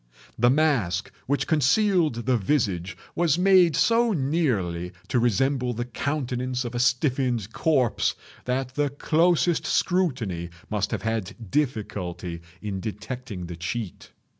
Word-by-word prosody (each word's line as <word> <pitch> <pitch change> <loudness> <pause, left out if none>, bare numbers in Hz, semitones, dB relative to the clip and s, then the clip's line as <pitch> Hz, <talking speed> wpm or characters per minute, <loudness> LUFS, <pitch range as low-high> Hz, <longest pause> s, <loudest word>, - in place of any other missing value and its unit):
The 120 +2 +4
mask 125 - +1 0.2
which 140 +2 +1
concealed 160 - +2
the 130 0 +3
visage 95 - 0 0.2
was 170 -2 +2
made 180 -4 +5
so 230 +4 +3
nearly 120 - 0 0.2
to 125 - +2
resemble 125 +2 +1
the 120 +1 -3
countenance 125 -1 -2
of 120 - -5
a 120 - -2
stiffened 125 -3 +1
corpse 135 -8 +1 0.3
that 130 0 -2
the 145 +1 +1
closest 165 +4 +2
scrutiny 125 - 0 0.2
must 105 -1 0
have - - -3
had 110 -1 -4
difficulty 100 - -2 0.2
in 100 -2 -3
detecting 105 0 -6
the 85 0 -7
cheat. 90 +4 -5
125 Hz, 125 wpm, -25 LUFS, 105-150 Hz, 0.3 s, made